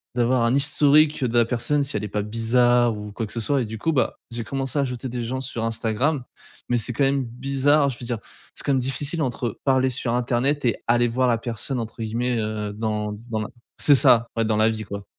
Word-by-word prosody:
d'avoir 120 0 +2
un 120 +3 +2
historique 145 +1 +3
de 120 0 0
la 120 - +5
personne 140 +5 0
si 140 -4 -1
elle 105 - -4
est - - -3
pas 105 0 -2
bizarre, 120 +1 +2
ou 105 0 -7
quoi 115 - -4
que 105 - -6
ce 115 - -3
soit, 135 +4 +1
et - - -4
du 110 +1 -7
coup 165 - 0
bah, 135 -4 0 0.2
j'ai 115 -1 -4
commencé 135 +2 -2
à - - +3
ajouter 125 0 -4
des 120 0 -4
gens 130 +3 -3
sur 120 -3 -4
Instagram, 120 +5 -1 0.5
mais 120 - +2
c'est 115 +2 +1
quand 140 - 0
même 135 0 +1
bizarre, 140 +4 +1
je 120 - -5
veux 120 - -6
dire, 120 -2 -3 0.3
c'est - - -4
quand 140 - 0
même 130 - +2
difficile 140 +5 -2
entre 120 -3 -3
parler 130 -1 +3
sur 120 -1 -2
internet 125 +4 0
et 115 - +1
«aller 120 +1 +3
voir 125 +2 +1
la 115 -1 +2
personne» 120 +2 -3
entre 115 0 -6
guillemets, 120 +2 -1
heu, 105 -1 -3
dans 105 -1 -2 0.2
dans 110 - -1
la 110 - -4 0.3
c'est 145 - +6
ça, 115 -2 +5
ouais 115 - +2
dans 110 -1 +1
la 110 +1 +4
vie 110 -1 -3
quoi. 100 0 -7
120 Hz, 245 wpm, -23 LUFS, 115-135 Hz, 0.5 s, c'est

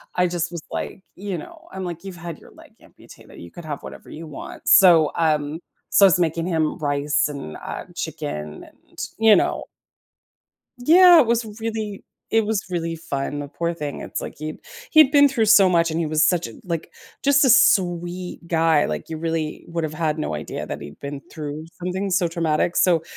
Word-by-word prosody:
I 180 0 +2
just 175 -1 -2
was 170 -2 -6
like, 190 - -5
you 195 -2 -5
know, - - -12
I'm 190 0 -6
like, 170 0 -6
"You've 190 -2 -8
had 170 -2 -7
your - - -17
leg - - -17
amputated, - - -17
you 85 - -10
could 175 - -11
have 145 -2 -5
whatever - - -11
you 160 +1 -9
want," 150 - -10
so, 170 -5 +7
um 155 -1 0 0.3
so 200 - +6
I - - +9
was 180 -2 +3
making 165 -1 0
him 160 -3 0
rice 145 0 0
and, 140 - -7
uh, - - -7
chicken 75 0 -5
and, - - -21 0.2
you 220 -1 +6
know. - - 0 1.1
Yeah! 345 +7 +7
It 265 - +4
was 235 0 +1 0.2
really 220 -3 -4 0.3
it 225 -1 +3
was 215 -3 -1
really 165 -1 -2
fun, 145 -3 -4
the 145 - -5
poor 170 +4 -3
thing. 150 -3 -5
It's - - -5
like - - -7
he'd 155 0 -5 0.3
he'd 310 -3 +6
been 285 -1 +6
through 240 -5 +1
so 205 -3 +6
much, 170 -2 +2
and 160 - -2
he 165 - -1
was 155 0 +3
such 175 -1 +1
a - - -11
like, 170 -4 -4 0.3
just 280 0 +4
a - - +4
sweet 180 -7 +2
guy. 160 -3 +3
Like, - - -4
you 160 - -5
really 160 -1 -3
would've 165 -2 -3
had 155 -1 -1
no 150 - -3
idea 75 - -5
that - - -6
he'd 75 - -11
been 140 0 -6
through 150 0 -6 0.2
something 190 +2 -2
so 180 -1 +2
traumatic, 165 0 0
so 170 -3 +3
170 Hz, 200 wpm, -22 LUFS, 155-195 Hz, 1.1 s, I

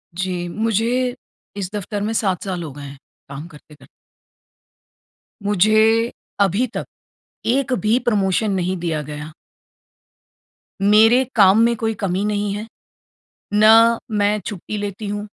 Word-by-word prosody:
जी, 180 -1 -3
मुझे 230 +5 0 0.4
इस 190 -2 -3
दफ़्तर 205 0 -4
में 220 +2 -2
7 190 -5 -1
साल 180 -3 -4
हो 150 - -7
गए 145 0 -10
हैं, 140 0 -9 0.3
काम 145 +4 -8
करते-करते। 150 -2 -17 1.6
मुझे 215 +4 +3 0.3
अभी 200 +6 +2
तक - - -3 0.6
एक 260 +1 +1
भी 220 +3 +3
प्रमोशन 205 -1 +1
नहीं 185 0 -1
दिया 165 -3 -2
गया। 150 +1 -8 1.5
मेरे 220 +5 +5
काम 200 0 +6
में 235 0 +2
कोई 225 0 -1
कमी 195 -1 -2
नहीं 205 -1 -1
है, 210 +2 -6 0.9
ना 225 +2 +6
मैं 210 0 +1
छुट्टी 210 +1 -5
लेती 205 +1 -5
हूँ, 205 +1 -4
205 Hz, 130 wpm, -20 LUFS, 185-225 Hz, 1.6 s, काम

